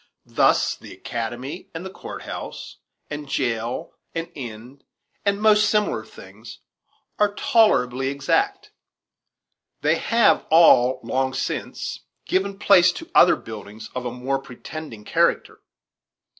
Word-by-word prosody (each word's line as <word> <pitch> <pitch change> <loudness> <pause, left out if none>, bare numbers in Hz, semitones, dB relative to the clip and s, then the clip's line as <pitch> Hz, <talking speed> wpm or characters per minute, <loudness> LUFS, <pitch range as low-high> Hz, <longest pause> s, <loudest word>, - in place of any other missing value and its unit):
Thus - - +2
the - - -13
academy, 120 +8 -6
and 185 +3 -6
court - - -8
house, - - -7 0.3
and 145 -1 -6
jail, 120 -3 -2 0.2
and 165 0 -4
inn, 125 +1 -9 0.4
and 200 0 +1
most 215 -1 +4
similar 210 0 +1
things, - - -13 0.6
are 205 -1 +2
tolerably 135 - +3
exact. 390 - 0 1.1
They - - +2
have 230 -2 +3
all, 130 -6 +6
long 130 0 -1
since, 135 - -4 0.3
given 195 +1 -1
place 185 -3 +5
to 330 - -10
other 175 - +7
buildings 105 -1 -10
of 125 -1 -4
a - - -4
more 130 +2 -2
pretending 135 -2 -9
character. - - +1
140 Hz, 115 wpm, -23 LUFS, 125-200 Hz, 1.1 s, other